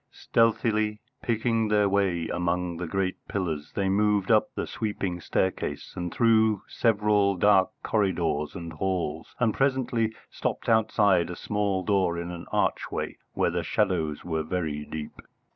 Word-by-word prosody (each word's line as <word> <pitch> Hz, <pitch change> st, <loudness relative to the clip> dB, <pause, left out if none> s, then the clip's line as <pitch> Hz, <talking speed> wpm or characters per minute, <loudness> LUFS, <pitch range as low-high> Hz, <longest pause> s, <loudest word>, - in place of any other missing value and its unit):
Stealthily, 110 Hz, -2 st, +1 dB, 0.2 s
picking 115 Hz, -1 st, +1 dB
their 105 Hz, -1 st, +3 dB
way 95 Hz, -4 st, +1 dB
among 90 Hz, 0 st, -1 dB
the 90 Hz, -, -4 dB
great 95 Hz, +1 st, -1 dB
pillars, 80 Hz, -7 st, -3 dB
they 100 Hz, -1 st, 0 dB
moved 105 Hz, +1 st, +2 dB
up 110 Hz, -1 st, +4 dB
the -, -, -2 dB
sweeping 100 Hz, -5 st, -3 dB
staircase 85 Hz, -5 st, -2 dB
and 90 Hz, -1 st, -3 dB
through 110 Hz, -3 st, +3 dB
several 105 Hz, -3 st, +2 dB
dark 95 Hz, +1 st, +4 dB
corridors 85 Hz, -8 st, 0 dB
and 85 Hz, -3 st, -6 dB
halls, 80 Hz, -2 st, -3 dB
and 115 Hz, -3 st, +2 dB
presently 125 Hz, -5 st, 0 dB, 0.2 s
stopped -, -, -3 dB
outside 105 Hz, -6 st, +3 dB
a 90 Hz, -, -5 dB
small 100 Hz, -2 st, -1 dB
door 95 Hz, -4 st, +1 dB
in 85 Hz, +1 st, -4 dB
an 85 Hz, -1 st, -8 dB
archway -, -, -1 dB, 0.2 s
where -, -, +1 dB
the -, -, -1 dB
shadows 85 Hz, -8 st, 0 dB
were 80 Hz, -2 st, -1 dB
very 80 Hz, -3 st, -3 dB
deep. 75 Hz, -1 st, -7 dB
95 Hz, 145 wpm, -27 LUFS, 85-105 Hz, 0.2 s, up